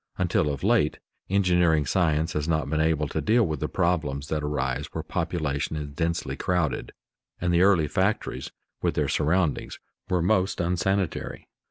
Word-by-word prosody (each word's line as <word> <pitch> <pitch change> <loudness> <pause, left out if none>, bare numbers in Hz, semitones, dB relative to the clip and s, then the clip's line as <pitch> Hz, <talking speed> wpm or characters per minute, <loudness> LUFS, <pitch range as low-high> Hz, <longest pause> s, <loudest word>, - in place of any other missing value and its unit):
Until 85 -4 +1
of 70 -2 -4
late, - - +3 0.3
engineering 90 -5 +3
science 80 +1 +1
has 75 0 -2
not 80 -2 0
been 75 +2 0
able 80 -2 +1
to 80 - -2
deal 110 - +3
with 80 -4 -3
the - - -2
problems 75 -5 -1
that 75 -1 -1
arise 70 -4 -2
where - - -5
population 80 -4 -2
is 75 -1 -4
densely 80 +2 -2
crowded, 90 -6 -1 0.5
and 90 0 0
the 85 - +4
early 95 -5 +4
factories 95 +6 -1 0.3
with - - 0
their - - +1
surroundings 80 +1 0 0.3
were 90 -3 +1
most 95 0 +1
unsanitary. 90 +2 -1
80 Hz, 160 wpm, -26 LUFS, 75-90 Hz, 0.5 s, the